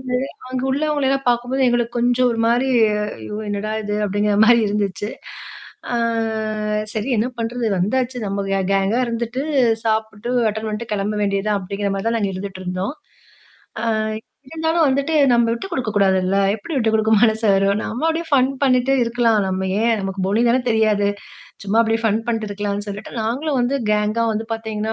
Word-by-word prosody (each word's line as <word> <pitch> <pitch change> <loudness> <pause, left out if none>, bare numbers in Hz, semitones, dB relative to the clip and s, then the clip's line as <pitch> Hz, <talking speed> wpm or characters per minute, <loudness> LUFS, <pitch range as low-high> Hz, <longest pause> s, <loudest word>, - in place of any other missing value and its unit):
போது, 255 -1 -2 0.3
அங்க 255 0 -2
உள்ளவங்கள 290 0 0
எல்லாம் 270 -1 0
பாக்கும்போது 250 +2 +1
எங்களுக்கு 240 0 0
கொஞ்சம் 245 +1 +3
ஒரு 230 - -2
மாரி, 245 +3 +2 0.5
"ஐயோ 110 - -7
என்னடா 205 +1 -3
இது!" 210 0 -2
அப்படிங்கிற 205 +1 0
மாரி 235 -1 +6
இருந்துச்சு. 205 -1 -2 0.9
"ஆ - - +1 1.0
சரி 220 +5 -2
என்ன 230 +4 +1
பண்ணுறது! 230 +1 -2
வந்தாச்சு. 250 +6 0
நம்ம 200 0 -2
கேங் 195 0 0
கேங்கா 195 +5 +2
இருந்துட்டு, 235 +3 -3 0.4
சாப்பிட்டு 220 +1 -1 0.2
அட்டெண்ட் 220 +1 -3
பண்ணிட்டு 215 +1 -5
கெளம்ப 205 +1 -2
வேண்டிய 200 -1 0
தான்" 210 - +1
அப்படிங்கிற 200 +2 -3
மாரி 195 +3 -4
தான் 230 - 0
நாங்க 200 -3 -1
இருந்துட்ருந்தோம். 185 +3 -4 0.9
ஆ - - -1 0.7
இருந்தாலும் 320 +1 +1
வந்துட்டு, 280 +4 0 0.2
நம்ம 235 -1 +3
விட்டு 235 +11 -5
கொடுக்க 255 -8 -2
கூடாதுல்ல? 190 -1 +2 0.2
எப்படி 225 +10 -8
விட்டு 225 -4 +1
கொடுக்க 220 0 +2
மனசு 220 0 +2
வரும்? 195 +1 +2
நம்ம 245 +8 -3
அப்படியே 325 +1 -1
ஃபன் 260 -1 +4
பண்ணிட்டு 260 0 +3
இருக்கலாம். 230 -2 +2
நம்ம 190 0 -2
ஏன்? 235 - +3
நமக்கு 195 0 -4
மொழி 205 +4 +2
தான 250 +2 +3
தெரியாது. 215 -2 +2 0.6
சும்மா 205 +3 +1
அப்படியே 225 0 0
ஃபன் 220 +1 +2
பண்ணிட்டு 225 -3 -1
இருக்கலாம்ன்னு 205 0 -3
சொல்லிட்டு 205 +1 -7
நாங்களும் 265 +6 -1
வந்து 255 +3 +1 0.2
கேங்கா 210 +2 +1
வந்து 220 +1 -3
பார்த்திங்கன்னா, 220 -1 -3
220 Hz, 165 wpm, -20 LUFS, 205-245 Hz, 1.0 s, மாரி